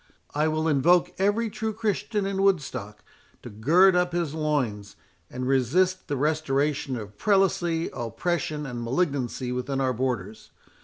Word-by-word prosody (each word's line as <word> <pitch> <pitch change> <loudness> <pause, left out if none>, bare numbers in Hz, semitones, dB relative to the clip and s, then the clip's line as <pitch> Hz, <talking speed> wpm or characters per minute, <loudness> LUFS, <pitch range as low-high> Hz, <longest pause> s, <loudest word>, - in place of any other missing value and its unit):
I 150 +2 +1
will 155 +1 0
invoke 160 +4 +3
every 205 +3 +1
true 220 +1 -3
Christian 210 -1 -1
in 195 0 -1
Woodstock 140 - -1 0.4
to 120 - -8
gird 170 - +4
up 180 -1 +1
his 170 -4 -1
loins, 135 -10 -2 0.3
and 125 0 -4
resist 170 +9 +1
the 145 - -2
restoration 145 -2 0
of 105 -2 -9
prelacy, 175 -5 +1
oppression, 150 +6 -2
and 120 -3 -5
malignancy 130 -1 -1
within 125 +2 -2
our 130 -1 +1
borders. 115 -5 -3
150 Hz, 140 wpm, -26 LUFS, 125-180 Hz, 0.4 s, gird